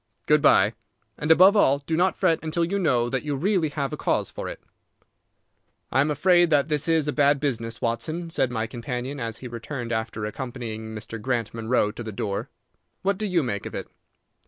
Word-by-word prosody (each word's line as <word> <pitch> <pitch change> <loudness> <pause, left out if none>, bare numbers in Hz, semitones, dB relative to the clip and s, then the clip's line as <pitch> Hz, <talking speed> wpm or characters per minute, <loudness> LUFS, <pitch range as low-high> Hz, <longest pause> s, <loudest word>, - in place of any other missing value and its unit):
Good - - +4
by; - - +5 0.4
and, 150 - -4
above 185 +5 +7
all, 140 -9 +5
do 145 +3 -3
not 180 +1 +2
fret 165 - +2
until 160 +1 0
you 200 +4 -1
know 125 -9 +2
that 130 +2 -1
you 145 -1 -2
really 175 +1 +1
have 140 -2 -3
a - - -3
cause - - 0
for - - -5
it." - - -7 1.3
"I 130 - +3
am 145 - +1
afraid 175 +3 +4
that 145 -1 +3
this 150 0 +1
is 160 -2 +2
a 150 - 0
bad 145 -1 +3
business, 115 -5 -2
Watson," 160 +9 -2
said 130 - +1
my 110 -2 -2
companion, 125 +3 -5
as 115 -2 -4
he - - -3
returned 120 +1 -6
after 110 -1 -2
accompanying 115 -1 -5
Mr. 110 +1 -7
Grant 120 -2 -1
Munro 115 -1 +1
to 120 - -8
the 110 -2 -5
door. 100 -1 -3 0.5
"What 195 0 0
do 215 - -1
you 180 -4 +2
make 100 -6 -3
of - - -8
it?" - - -5
135 Hz, 205 wpm, -25 LUFS, 115-160 Hz, 1.3 s, above